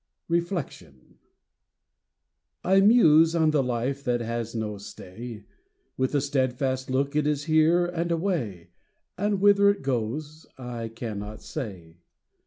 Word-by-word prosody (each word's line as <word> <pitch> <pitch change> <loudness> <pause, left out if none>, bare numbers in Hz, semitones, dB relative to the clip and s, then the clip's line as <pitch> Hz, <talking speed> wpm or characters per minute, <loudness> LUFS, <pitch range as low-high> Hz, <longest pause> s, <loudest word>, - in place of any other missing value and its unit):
REFLECTION. 170 - -4 1.4
I 190 +1 +4
muse 165 -7 +6
on 160 -2 +3
the 150 -2 +2
life 125 +2 -2
that 120 -2 0
has 115 0 -4
no 105 -2 -3
stay; 105 +2 -9 0.5
With 130 +1 -1
the 145 - +2
steadfast 130 -1 -1
look 140 +3 0
it 150 -1 +2
is 145 -1 0
here 160 +3 +3
and 175 -1 -2
away, 160 - -2 0.4
And 205 0 0
whither 200 0 +5
it 200 -5 0
goes 140 +5 -3
I 120 -3 -5
cannot 110 -2 -7
say. 95 - -7
135 Hz, 125 wpm, -26 LUFS, 115-165 Hz, 1.4 s, muse